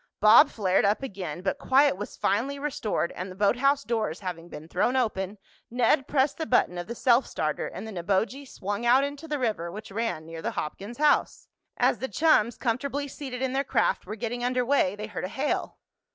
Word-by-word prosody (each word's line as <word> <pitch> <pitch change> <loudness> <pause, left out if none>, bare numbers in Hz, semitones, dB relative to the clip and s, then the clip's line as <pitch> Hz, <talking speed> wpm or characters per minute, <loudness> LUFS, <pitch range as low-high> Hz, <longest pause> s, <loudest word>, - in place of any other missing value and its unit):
Bob 215 +2 +7
flared 190 -4 +1
up 205 +6 +1
again, 185 - -5
but 190 - -1
quiet 275 -1 +4
was 205 +2 -7
finally 265 +7 0
restored 265 -11 -2
and, 185 +1 -6
the 185 - -9
boathouse 265 +8 +2
doors 220 -7 -2
having 175 -3 -6
been 155 -1 -9
thrown 190 +9 0
open, 210 -5 -1 0.3
Ned 250 +3 +2
pressed 280 +1 +1
the 320 - -2
button 180 -8 +2
of 175 - -6
the 235 - -5
self 245 +1 +3
starter 155 -1 -2
and 205 +4 -7
the - - -7
Neboje 200 +9 -1
swung 205 +3 -4
out 250 +3 +5
into 285 +3 -5
the 300 -1 -2
river 215 -10 -2
which 210 +2 -9
ran 215 -7 -2
near 165 0 -8
the - - -4
Hopkins' 200 +9 -5
house. 300 0 +2 0.3
As 230 - +2
the 265 - -2
chums, 260 -8 +3
comfortably 275 +4 -2
seated 265 -2 -6
in 260 -1 -1
their 275 +1 +1
craft, 250 - 0
were 215 - -4
getting 240 +2 -4
under 250 0 +1
way, 240 -8 +2
they 210 +1 -5
heard 210 -4 -6
a - - -5
hail. 275 +7 -2
230 Hz, 205 wpm, -27 LUFS, 195-270 Hz, 0.3 s, Bob